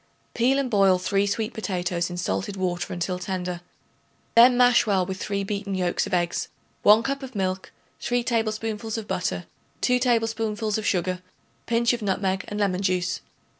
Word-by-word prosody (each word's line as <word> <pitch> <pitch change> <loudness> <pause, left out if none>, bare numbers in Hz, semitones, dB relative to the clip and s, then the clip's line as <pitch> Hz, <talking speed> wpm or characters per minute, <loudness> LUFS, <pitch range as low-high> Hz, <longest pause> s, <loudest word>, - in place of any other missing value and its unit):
Peel 255 +3 +2
and 270 -3 -1
boil 195 -3 +5
3 195 +2 +1
sweet 215 +2 -2
potatoes 180 -5 -2
in 175 - -6
salted 195 +3 -2
water 180 0 -2
until 180 0 -2
tender; 180 -1 -4 0.7
then 245 +2 +7
mash 245 -1 +5
well 190 -3 +2
with 190 +1 -5
3 200 -1 -2
beaten 200 0 -3
yolks 180 +1 0
of 200 - -7
eggs, 175 -1 -1 0.3
1 215 +2 +6
cup 275 +3 -2
of 260 -3 -9
milk, 185 -1 -2 0.3
3 245 0 0
tablespoonfuls 225 -1 -2
of 220 -2 -6
butter, - - -2 0.4
2 250 0 +3
tablespoonfuls 225 -3 0
of 215 - -3
sugar, 185 0 0
a 185 0 -37
pinch 235 0 +2
of 240 - -3
nutmeg 190 -1 0
and 205 - -4
lemon 195 -2 +1
juice. 185 -1 0
205 Hz, 170 wpm, -25 LUFS, 185-225 Hz, 0.7 s, then